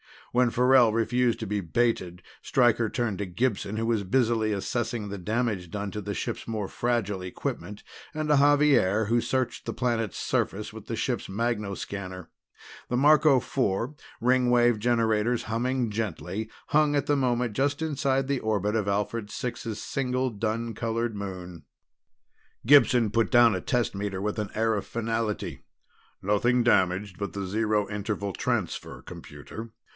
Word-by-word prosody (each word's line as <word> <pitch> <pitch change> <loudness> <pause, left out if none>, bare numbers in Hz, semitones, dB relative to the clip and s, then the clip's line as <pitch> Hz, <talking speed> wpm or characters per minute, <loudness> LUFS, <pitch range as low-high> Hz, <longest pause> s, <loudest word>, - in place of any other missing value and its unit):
When 125 0 +3
Farrell 125 -1 +5
refused 120 +1 +1
to - - -2
be 105 0 -1
baited 90 -2 -1 0.2
Stryker 120 -3 +2
turned 120 -7 -1
to 100 - -1
Gibson, 100 +2 -1
who 110 +1 -1
was 115 -3 0
busily 110 0 +2
assessing 110 +1 -2
the 100 - -5
damage 105 -2 -2
done 100 +2 -4
to 105 - -5
the 100 0 -4
ship's - - -4
more 110 -4 -3
fragile 115 -6 -1
equipment, 95 +2 -5 0.3
and 155 0 -3
to 150 - +5
Xavier, 140 -8 +4
who 115 +3 +2
searched 130 -1 -2
the - - -3
planet's 115 -4 -1
surface - - -1
with - - -10
the - - -3
ship's - - -2
magnoscanner. 100 -4 -4 0.6
The 125 - 0
Marco 150 0 +5
Four, 120 +1 -1 0.3
Ringwave 120 -2 +3
generators 115 0 +1
humming 120 +1 -1
gently, 105 0 -3 0.2
hung 150 -1 +3
at 145 -1 0
the 145 - +3
moment 125 -3 +1
just 140 +6 0
inside 135 -4 0
the 140 -2 +1
orbit 105 -1 0
of 105 -3 0
Alphard 105 +2 -1
Six's 115 -4 -4
single 130 -1 -1
dun 115 +2 -2
colored 115 +1 -2
moon. 90 -4 -7 1.0
Gibson 125 -4 +5
put 115 +1 +2
down 120 -3 +6
a 95 - -2
test 120 +3 0
meter 100 -1 -3
with 105 +2 -2
an 105 -2 -2
air 110 0 +2
of 100 - -4
finality. 115 -2 -3 0.6
"Nothing 120 +5 +2
damaged 95 -3 +2
but 100 - -4
the 100 -1 -3
Zero 105 +1 0
Interval 105 -1 -3
Transfer - - -3
computer. 115 +1 -10
115 Hz, 150 wpm, -27 LUFS, 100-125 Hz, 1.0 s, down